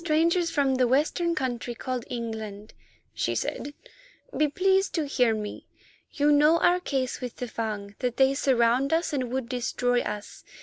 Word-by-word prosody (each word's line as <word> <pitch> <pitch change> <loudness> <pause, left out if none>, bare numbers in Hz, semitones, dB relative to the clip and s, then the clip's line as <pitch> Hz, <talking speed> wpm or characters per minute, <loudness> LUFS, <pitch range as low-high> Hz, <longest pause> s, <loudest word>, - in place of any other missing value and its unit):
"Strangers 335 +2 +2
from 280 -4 +1
the 255 -1 +2
Western 315 +6 +1
country 245 -4 -3
called 250 0 -4
England," 220 -3 -6 0.4
she - - -1
said, 290 0 -3 0.6
"be 305 - +3
pleased 380 +5 +1
to 320 -3 0
hear 250 -5 +2
me. 210 -1 -6 0.4
You 295 0 +2
know 300 +3 +5
our 350 +1 +3
case 270 -7 -2
with 250 -2 -5
the 250 - -5
Fung—that 220 +1 -4
they 265 0 +4
surround 260 +1 +2
us 330 -1 0
and 255 -4 -2
would 260 -2 -2
destroy 245 0 0
us. 210 0 -6
260 Hz, 160 wpm, -26 LUFS, 235-300 Hz, 0.6 s, know